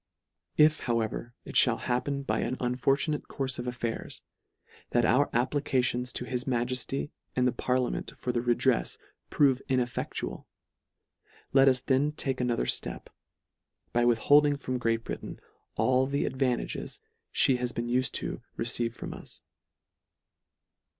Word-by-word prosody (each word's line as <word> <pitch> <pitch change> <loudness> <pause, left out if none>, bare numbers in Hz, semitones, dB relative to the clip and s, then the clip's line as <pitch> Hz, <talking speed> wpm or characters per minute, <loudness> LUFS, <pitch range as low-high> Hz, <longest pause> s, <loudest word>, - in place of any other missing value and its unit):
If, 155 0 +5
however, 115 +1 -1
it - - +4
(hall - - +1
happen 140 +3 -1
by - - 0
an 130 - -1
unfortu 130 +4 +1
nate 150 -1 -2
courfe 135 -1 -3
of 125 - -4
affairs, 120 -2 -4 0.7
that 120 -1 +2
our 135 +5 +3
applications 125 -1 0
to 125 - -3
his 125 0 -3
Majefty 130 +3 -1 0.2
and 125 0 +3
the - - +3
parliament 125 0 -1
for 125 - -2
the 120 - 0
redrefs, 120 0 +1 0.3
prove 135 -3 +3
ineffectual, 125 -2 -2 1.1
let 135 0 +6
us 130 -2 +4
then 140 +3 +1
take 135 -4 -2
another 120 -2 0
flep, - - -2 0.8
by 120 - +3
withholding 145 +5 +5
from 130 -2 -3
Great 115 -1 0
Britain, - - -6 0.4
all 130 +1 +3
the 140 +1 0
advantages 130 -2 -2 0.3
fhe 130 -2 +3
has 125 -1 -1
been 120 -1 -3
ufed 125 +1 +1
to - - -3
receive 115 0 -1
from - - -6
us. - - -9
125 Hz, 135 wpm, -29 LUFS, 120-135 Hz, 1.1 s, let